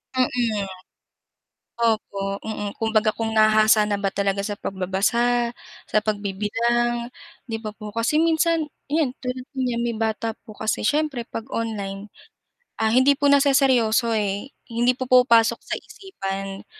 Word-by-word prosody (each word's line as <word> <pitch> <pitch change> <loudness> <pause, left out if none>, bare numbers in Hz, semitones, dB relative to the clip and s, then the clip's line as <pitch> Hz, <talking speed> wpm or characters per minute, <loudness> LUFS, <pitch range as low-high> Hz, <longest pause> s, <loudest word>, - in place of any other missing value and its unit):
Mm. 240 -5 +1 1.1
Opo, 200 -4 -1
mm, 210 -2 -4
kumbaga 220 -1 +2
kung 225 -1 -2
nahahasa 215 0 +5
na 205 -1 -2
ba 195 - +1
talaga 200 0 -1
sa 205 0 -4
pagbabasa, 235 +6 0 0.3
sa - - 0
pagbibilang, 230 +4 -1 0.3
'di 225 -2 -5
ba 215 - -4
po? 210 -1 -9
Kasi 230 +6 +1
minsan 330 0 +2 0.2
'yan, 290 -4 +1
tulad 255 0 -4
niya 250 -3 -1
may 235 0 -1
bata 225 0 -2
po 215 - -13
kasi 215 -1 -1
siyempre 295 0 0
'pag 225 - -5
online, 205 -3 -4 0.7
ah, 220 - +3
hindi 260 +5 +5
po 285 0 +1
naseseryoso, 260 -5 +3
eh, 205 +5 -2 0.2
hindi 240 +2 +2
pumapasok 245 -3 +4
sa - - -4
isipan, 195 - -6
225 Hz, 130 wpm, -23 LUFS, 210-250 Hz, 1.1 s, nahahasa